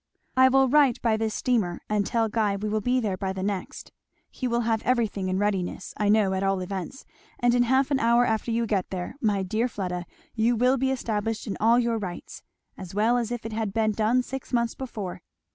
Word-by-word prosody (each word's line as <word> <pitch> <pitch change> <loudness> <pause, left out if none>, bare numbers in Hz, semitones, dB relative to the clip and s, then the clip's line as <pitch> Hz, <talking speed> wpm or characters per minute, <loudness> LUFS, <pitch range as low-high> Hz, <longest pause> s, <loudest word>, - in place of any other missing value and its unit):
I 260 0 +6
will 270 0 +4
write 275 -2 +4
by 230 -2 +3
this 220 0 -2
steamer 215 -9 0
and 210 -1 +1
tell 230 -1 +1
Guy 210 -2 0
we 205 +2 -3
will 215 0 0
be 250 +4 +1
there 205 -6 -2
by 190 0 -2
the 190 0 -4
next. 195 -2 -4 0.4
He 255 - -3
will 235 0 +1
have 225 -1 0
everything 220 -6 0
in 185 - 0
readiness, 195 -3 -2
I 210 -1 0
know, 210 -2 +3
at 190 - -1
all 195 -1 +1
events; 190 +7 -6 0.3
and 245 0 +2
in 245 - +3
half 260 +3 +2
an 275 - +2
hour 235 +1 +4
after 220 +1 -1
you 230 0 +1
get 200 -4 -1
there, 180 +3 -5
my 205 -3 +1
dear 215 +6 0
Fleda, 180 -6 -4 0.3
you 230 +2 +2
will 250 +3 +3
be 265 +1 +1
established 225 -4 -2
in 205 - -3
all 230 +2 +4
your 235 -2 +1
rights 180 -4 -7 0.4
as 185 -1 -8
well 220 +4 +3
as 235 -2 0
if 240 -2 -4
it 225 - -5
had 215 -3 -2
been 220 0 +2
done 225 +4 +1
six 265 +1 -7
months 235 -2 +1
before. 195 -8 -6
220 Hz, 225 wpm, -26 LUFS, 200-240 Hz, 0.4 s, I